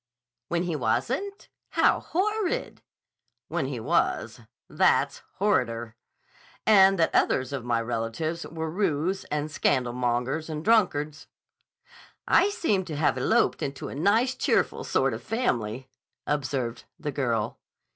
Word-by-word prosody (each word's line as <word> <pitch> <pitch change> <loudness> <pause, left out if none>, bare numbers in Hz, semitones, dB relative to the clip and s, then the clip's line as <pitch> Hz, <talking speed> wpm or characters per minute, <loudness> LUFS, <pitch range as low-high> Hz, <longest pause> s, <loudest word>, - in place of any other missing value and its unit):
"When 170 0 0
he 175 -3 -2
wasn't? 135 - -1 0.3
How - - +4
horrid!" 425 +5 -1 0.7
"When - - -1
he - - -4
was. - - 0 0.3
That's - - +2 0.2
horrider. 120 - 0 0.7
And 195 -2 +6
that 165 - +2
others 130 +1 +2
of 135 -3 -3
my 120 -1 +1
relatives 120 +9 -3
were 160 -1 -4
roués 185 0 0
and 150 0 -2
scandalmongers 125 +3 0
and 155 +1 -5
drunkards." 155 -9 +2 1.0
"I 395 - +5
seem 325 - 0
to 155 - -5
have 145 -3 +2
eloped 130 - +2
into 135 -1 -4
a - - -7
nice 215 - +2
cheerful 255 - 0
sort - - +1
of - - -5
family," 125 - -2 0.4
observed 130 -4 -2
the 150 -2 -3
girl. 120 -6 -1
150 Hz, 125 wpm, -26 LUFS, 125-195 Hz, 1.0 s, And